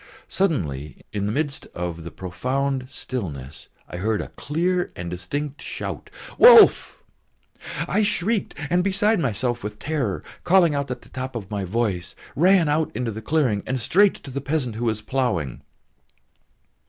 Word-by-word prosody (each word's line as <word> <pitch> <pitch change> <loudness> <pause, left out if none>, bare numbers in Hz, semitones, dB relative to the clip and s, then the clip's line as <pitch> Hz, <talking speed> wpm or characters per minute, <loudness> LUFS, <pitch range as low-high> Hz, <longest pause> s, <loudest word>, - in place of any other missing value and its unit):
Suddenly 75 - -1 0.2
in 100 -1 -1
the - - 0
midst 145 +2 -2
of 85 -1 -4
the 85 - -6
profound 130 +9 -2
stillness 75 - -6 0.2
I - - -7
heard 105 +3 0
a - - -5
clear 175 +4 -1
and 85 -1 -5
distinct 140 +11 -4
shout, - - -5 0.3
"Wolf!" 470 -3 +8 0.8
I 215 - +2
shrieked 205 +1 0 0.2
and, 180 +1 +3
beside 200 +2 +2
myself 120 - -1
with 105 0 -5
terror, 135 - -2 0.2
calling 175 -3 +5
out 140 -1 -2
at 125 - -5
the - - -17
top 130 0 -5
of 105 -3 -6
my 100 -2 -2
voice, 95 -4 -2 0.2
ran 180 +1 +5
out 150 +2 +1
into 120 0 -1
the 110 +1 -6
clearing 125 -6 +1
and 130 0 -1
straight 195 - +4
to 135 - -10
the 140 +2 -3
peasant 140 -4 -1
who 120 +2 -3
was 110 -2 -1
ploughing. 100 - -1
130 Hz, 155 wpm, -23 LUFS, 100-160 Hz, 0.8 s, Wolf